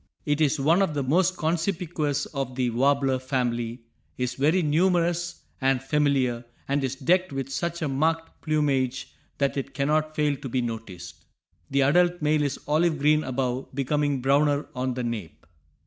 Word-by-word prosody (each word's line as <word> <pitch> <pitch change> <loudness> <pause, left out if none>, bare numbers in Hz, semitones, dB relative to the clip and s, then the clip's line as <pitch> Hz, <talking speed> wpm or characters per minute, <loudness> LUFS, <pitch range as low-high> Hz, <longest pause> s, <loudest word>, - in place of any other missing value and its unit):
It 145 +1 0
is 150 0 +2
one 165 +7 +3
of 160 -6 0
the 140 - 0
most 180 +7 +2
conspicuous 160 -3 -1
of 135 -3 -4
the 125 -2 0
warbler 135 +1 +2
family, 120 -2 -2 0.3
is 125 -1 -1
very 155 +7 +2
numerous 175 +2 +1 0.2
and 135 -1 +2
familiar, 135 -3 +1 0.2
and 140 0 0
is 135 0 -1
decked 180 +6 +1
with 135 -1 -4
such 170 +3 -2
a - - 0
marked 160 +4 -1
plumage 140 -4 0 0.2
that 140 0 0
it 140 0 -4
cannot 155 +2 0
fail 150 -1 +1
to 135 - -7
be 125 +1 0
noticed. 115 -6 -7 0.4
The 140 0 +2
adult 175 +5 +3
male 150 0 +2
is 145 -2 -1
olive 155 +2 +2
green 150 +2 +3
above, 130 0 -3
becoming 140 0 0
browner 145 +2 +2
on 130 0 -2
the 125 - -3
nape. 110 -11 -5
140 Hz, 165 wpm, -26 LUFS, 130-155 Hz, 0.4 s, one